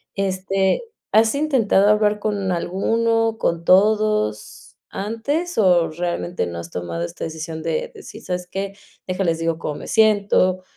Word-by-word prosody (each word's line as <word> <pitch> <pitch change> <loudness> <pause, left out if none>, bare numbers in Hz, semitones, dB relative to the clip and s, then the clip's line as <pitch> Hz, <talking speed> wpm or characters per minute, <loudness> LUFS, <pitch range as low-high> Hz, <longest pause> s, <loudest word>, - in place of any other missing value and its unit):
Este, 195 - 0 0.3
¿has 220 +1 +5
intentado 250 -9 +3
hablar 210 0 +3
con 205 -3 -1
alguno, 225 +6 0
con 170 0 0
todos 205 - +2 0.3
antes 280 - -3
o, 180 -5 +4
realmente, 175 - -3
no 85 -1 -6
has 85 - -8
tomado 85 -1 -4
esta - - -6
decisión 160 0 -5
de 165 -1 -2
decir: - - -11
"¿Sabes 180 0 -3
qué? 195 +1 -4 0.3
Deja, 185 +1 -1
les 165 -2 0
digo 165 -1 -1
cómo 150 - -4
me - - -9
siento", 200 -4 +3
190 Hz, 145 wpm, -21 LUFS, 170-215 Hz, 0.3 s, has